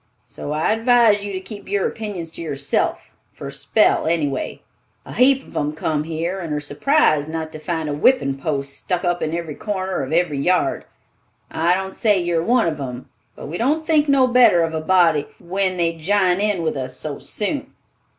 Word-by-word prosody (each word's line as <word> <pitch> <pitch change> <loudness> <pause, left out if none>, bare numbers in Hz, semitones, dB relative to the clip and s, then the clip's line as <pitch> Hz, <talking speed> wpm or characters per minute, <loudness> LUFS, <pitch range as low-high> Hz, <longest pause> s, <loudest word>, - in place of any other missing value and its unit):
So 145 - -7
I 155 +6 +1
advise 225 -2 +4
you 205 - -4
to 190 - -3
keep 200 +2 -10
your 200 -1 +1
opinions 195 -7 -6
to - - -9
yourself 140 -3 -2 0.2
for - - -10
a - - -8
spell, - - +2
any 160 -2 +1
way. 135 -2 -5 0.4
A - - -9
heap 270 +3 +4
on 145 - 0
'em 150 - -3
come 155 -1 -2
here, 165 +4 -3
and 170 -4 -5
are - - -1
surprised 155 - +1
not 160 -1 -4
to 155 - -8
find 160 -1 -3
a 145 - -2
whippin' 145 - +2
post 140 -2 -3
stuck 180 0 -3
up 175 0 0
in 155 - -1
a 165 -2 -4
corner 190 -1 -3
of 135 +1 -5
every 160 -4 +1
yard. 180 +6 +1 0.7
I 170 +2 +2
don't 190 0 -4
say 210 -3 +3
you 175 -1 0
are - - -1
one 240 0 +3
of 155 -3 -2
'em; 125 -2 -6 0.3
but - - -9
we 160 +4 -5
don't 300 +7 +1
think 305 -2 +2
no 275 -2 +5
better 245 -9 +5
of 165 0 -2
a 160 - -2
body 165 -4 +3
when 185 +1 -1
they 170 -1 +1
jine 185 +3 +1
in 205 -5 0
with 160 - -1
us 130 -1 -5
so 150 -2 -5
soon." 265 +7 -4
175 Hz, 210 wpm, -21 LUFS, 155-205 Hz, 0.7 s, no